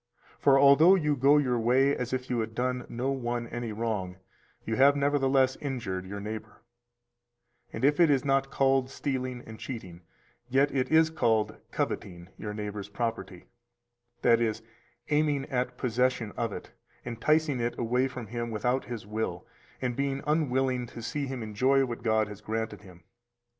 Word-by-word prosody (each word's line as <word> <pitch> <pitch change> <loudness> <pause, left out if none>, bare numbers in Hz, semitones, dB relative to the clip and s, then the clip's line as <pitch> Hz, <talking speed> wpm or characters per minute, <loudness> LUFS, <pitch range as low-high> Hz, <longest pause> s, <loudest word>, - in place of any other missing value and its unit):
For 135 -1 +5
although 140 +7 +7
you 150 -5 +1
go 140 +3 +5
your 125 -5 +1
way 130 +5 +3
as 125 -1 -4
if 130 0 -2
you 125 - -1
had 110 0 -3
done 125 0 -1
no 125 +3 -2
one 120 -3 -2
any 120 -1 -4
wrong, 105 -5 -3 0.5
you 110 - -1
have 140 +3 +6
nevertheless 135 -2 +2
injured 110 -10 -4
your 100 +1 -6
neighbor; 110 +2 -7 1.1
and 115 - -1
if 145 +2 +3
it 170 -2 +6
is 140 -2 +2
not 135 0 +2
called 135 -1 +2
stealing 130 -3 -3
and 110 0 -10
cheating, 95 -9 -7 0.5
yet 135 +3 +2
it 130 -2 0
is 160 0 +5
called 110 -8 +1
coveting 85 -1 -4
your 105 - -6
neighbor's 105 -1 -5
property, 115 -5 -4 0.8
that 115 -1 +5
is, 110 -1 -1 0.5
aiming 150 -2 +2
at 125 -1 -1
possession 125 -2 0
of 115 -2 -2
it, - - -8 0.3
enticing 140 +4 +1
it 120 0 -2
away 125 +3 +1
from 130 -3 -7
him 120 +2 -4
without 125 +4 -1
his 120 -4 -6
will, 105 -4 -3 0.4
and 125 -1 -1
being 140 +1 -2
unwilling 130 -5 +1
to 115 -1 -9
see 140 +4 -3
him 130 -3 -5
enjoy 130 +6 +2
what 120 -2 -6
God 110 -2 +2
has 105 -1 -10
granted 110 +1 -3
him. 90 -4 -15
125 Hz, 165 wpm, -28 LUFS, 110-135 Hz, 1.1 s, although